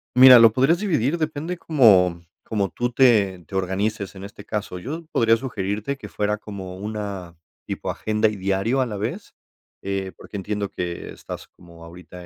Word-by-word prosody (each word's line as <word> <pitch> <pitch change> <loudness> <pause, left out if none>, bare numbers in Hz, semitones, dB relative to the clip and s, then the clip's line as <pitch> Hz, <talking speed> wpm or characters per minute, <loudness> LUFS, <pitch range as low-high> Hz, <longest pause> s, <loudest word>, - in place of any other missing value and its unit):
Mira, 130 -1 +10
lo 115 -1 +8
podrías 135 +9 +3
dividir. 165 - 0
Depende 155 +3 -3
como 95 - +4 0.2
como 100 -3 -1
tú 120 +8 -2
te 105 -8 +3
te - - -16
organices 100 +2 -2
en 95 - -9
este 100 0 -10
caso, 105 -4 -4
yo 155 - -6
podría 115 0 +3
sugerirte 110 +1 -3
que - - -10
fuera 105 0 -1
como 95 -3 -8
una 100 -4 -6 0.3
tipo - - -3
agenda 110 0 0
y 105 - -2
diario 100 +7 0
a 125 - 0
la 105 -3 -5
vez, 105 - -5 0.5
eh, 95 -1 -3
porque - - -12
entiendo 100 +1 -3
que 85 -1 -5
estás - - -9
como 85 -1 -16
ahorita 90 +1 -12
105 Hz, 170 wpm, -23 LUFS, 95-120 Hz, 0.5 s, Mira